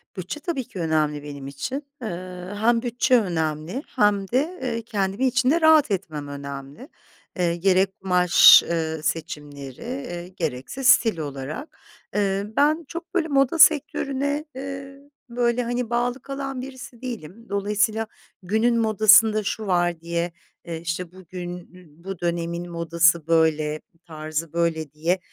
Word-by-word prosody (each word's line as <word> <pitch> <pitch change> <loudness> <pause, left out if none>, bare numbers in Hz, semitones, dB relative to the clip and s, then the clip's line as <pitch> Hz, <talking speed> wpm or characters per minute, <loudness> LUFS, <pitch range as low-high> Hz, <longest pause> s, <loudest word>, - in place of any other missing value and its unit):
Bütçe 185 - -5
tabii 315 -5 -3
ki 190 - -9
önemli 155 -3 0
benim 140 -2 -8
için. 145 - -4 0.2
Eee, 180 -3 -6
hem 230 +3 +2
bütçe 245 +1 +2
önemli 160 - -2
hem 205 -2 +2
de, 295 - -1
eee, 230 -3 -2
kendimi 205 +2 -1
içinde 265 +6 +2
rahat 315 -6 +5
etmem 160 -7 -3
önemli. 140 - -8 0.5
Eee, 170 -1 +1
gerek 190 +1 +2
kumaş, 180 -2 +7
ııı, 160 -2 -2
seçimleri, 145 -4 -5
eee, 235 -9 -5
gerekse 165 - -5
stil 230 -6 +5
olarak. 145 - -6 0.4
Eee, 200 -1 +1
ben 305 +3 +3
çok, 335 +3 -8
böyle, 335 -3 +1
moda 275 +2 +2
sektörüne, 285 -1 +3
eee, 275 +1 -7 0.3
böyle, 240 0 +1
hani, 240 0 -2
bağlı 240 +2 -1
kalan 275 -1 -5
birisi 260 -2 -10
değilim. 230 -4 -7
Dolayısıyla 210 +2 0 0.4
günün 220 +5 +2
modasında 215 0 +5
"Şu 215 +1 -3
var." 175 -2 +1
diye, 170 +1 -2 0.3
eee, 165 -1 -5
işte, 175 +1 -4
"Bugün 180 -1 -7 0.2
n 170 -3 -18
bu 190 -2 -6
dönemin 170 0 -3
modası 170 -1 +2
böyle, 155 -2 +2 0.2
tarzı 155 0 -5
böyle." 165 -3 -1
diye, 165 +5 0
190 Hz, 135 wpm, -24 LUFS, 165-245 Hz, 0.5 s, kumaş